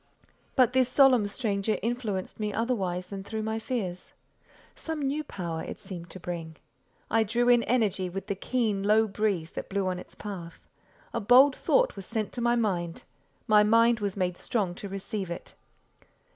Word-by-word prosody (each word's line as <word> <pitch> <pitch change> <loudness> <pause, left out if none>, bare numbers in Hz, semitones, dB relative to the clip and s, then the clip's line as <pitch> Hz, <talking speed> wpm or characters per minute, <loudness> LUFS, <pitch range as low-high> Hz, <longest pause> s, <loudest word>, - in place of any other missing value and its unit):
But 255 -2 +4
this 260 -1 +3
solemn 255 -5 +5
stranger 205 -1 -1
influenced 225 -6 -3
me 210 -1 -1
otherwise 195 -6 -1
than 195 -1 -6
through 220 +2 -4
my 220 +1 -2
fears. 210 -7 -4 0.6
Some 320 -1 -5
new 285 +3 -1
power 170 - -5
it - - -7
seemed 175 -3 -8
to 185 - -9
bring. 165 -2 -5 0.6
I 225 - +4
drew 235 +3 0
in 240 -1 +6
energy 210 -7 +1
with 195 +2 -5
the 200 - -1
keen, 215 0 -1
low 215 +2 +4
breeze 195 -5 -1
that - - -6
blew 200 0 0
on 185 -1 -1
its - - -12
path. 180 -5 -7 0.5
A 235 - 0
bold 255 +6 +7
thought - - +2
was 195 -2 -8
sent 220 -3 -3
to 245 - -4
my 240 0 +3
mind; 180 -7 -1 0.4
my 210 -1 +6
mind 230 +2 +4
was 200 -1 -2
made 180 -2 -1
strong 200 -7 -1
to 200 +2 -7
receive 195 0 -4
it. 170 - -6
210 Hz, 175 wpm, -28 LUFS, 185-235 Hz, 0.6 s, bold